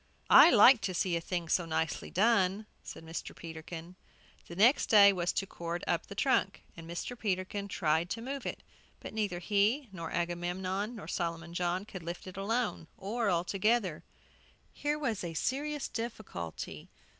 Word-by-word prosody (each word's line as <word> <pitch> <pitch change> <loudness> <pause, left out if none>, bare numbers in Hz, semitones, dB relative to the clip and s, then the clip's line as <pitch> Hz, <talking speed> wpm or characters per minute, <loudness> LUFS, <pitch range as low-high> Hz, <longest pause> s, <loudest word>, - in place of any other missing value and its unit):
"I - - +10
like 240 -1 +7
to 190 -2 -2
see 175 0 +1
a 170 - -1
thing 175 0 -3
so 170 +1 +1
nicely 160 -1 -2
done," 200 -1 +2 0.2
said 165 - -10
Mr. 165 +1 -6
Peterkin. 165 +1 -8 0.5
The 170 - -9
next 235 +9 +4
thing 200 -2 +8
was 175 0 0
to 195 - -1
cord 170 -2 -5
up - - -1
the - - -9
trunk, - - +1
and 165 0 -10
Mr. 175 +8 -4
Peterkin 200 -2 -2
tried 165 -3 0
to 225 - -3
move 270 +1 -4
it. - - -5 0.4
But - - -9
neither 205 -5 -1
he, 210 - +1
nor 165 -4 -6
Agamemnon, 180 +5 -2
nor 215 - -9
Solomon 170 -1 -3
John 180 +2 -1
could 185 -4 -8
lift 170 +1 -6
it 185 - -9
alone, 210 -3 -1
or 220 +3 -1
all 170 -2 +2
together. 195 -2 0 0.7
Here 295 +1 -1
was 230 -10 -2
a 165 -2 -5
serious 290 - -2
difficulty. 215 - -6
185 Hz, 170 wpm, -31 LUFS, 170-220 Hz, 0.7 s, I